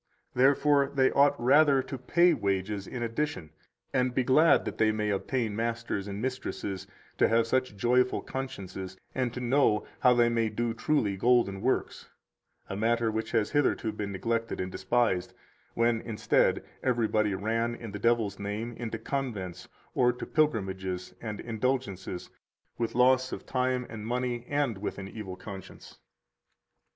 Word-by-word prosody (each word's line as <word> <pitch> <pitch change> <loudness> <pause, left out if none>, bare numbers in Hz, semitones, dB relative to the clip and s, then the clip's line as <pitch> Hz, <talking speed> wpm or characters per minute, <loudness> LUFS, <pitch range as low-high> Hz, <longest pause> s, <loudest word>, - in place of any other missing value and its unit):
144 140 +2 +4
Therefore 140 - -14
they 130 -1 +4
ought 145 +1 +4
rather 135 +2 +5
to 135 - -6
pay 170 +7 +3
wages 100 -3 -1
in 125 -2 -4
addition 115 - -3 0.4
and 125 -1 +1
be 130 - +2
glad 150 +6 +5
that - - -5
they 110 -1 +4
may 105 -1 -1
obtain 110 +2 -1
masters 115 -3 -2
and 100 0 -5
mistresses 120 -6 -4 0.3
to - - +5
have 115 0 +3
such 130 -3 0
joyful 125 +3 +2
consciences 95 -8 -6 0.2
and 125 -2 -1
to 125 - -6
know 125 -3 +2
how 125 - +5
they 120 -1 +4
may 115 -1 +1
do 115 +2 -1
truly 115 -4 0
golden 100 -2 +2
works; - - -1 0.6
a - - -5
matter 115 +2 +1
which 110 0 -3
has 110 -3 +1
hitherto 145 -6 +1
been 100 -1 -4
neglected 115 +4 -2
and 95 0 -3
despised, 95 -2 0 0.4
when, 115 -1 +2
instead, 110 -2 +1 0.2
everybody 110 -4 +1
ran, 115 +4 -1
in 115 -3 -8
the 105 - -6
devil's 115 -3 +1
name, 105 +3 -3
into 115 -1 -4
convents 110 -11 -4 0.3
or 125 -1 +4
to 125 - -7
pilgrimages 95 - -1
and 105 -3 -5
indulgences, 115 -6 -3 0.4
with 115 -1 -3
loss 130 +1 +4
[of - - -6
time 130 -1 0
and 110 -1 -7
money] 125 0 -2
and 145 -8 0
with 105 - -4
an 95 -1 -6
evil 100 -3 -7
conscience. 95 -1 -10
115 Hz, 155 wpm, -29 LUFS, 105-125 Hz, 0.6 s, rather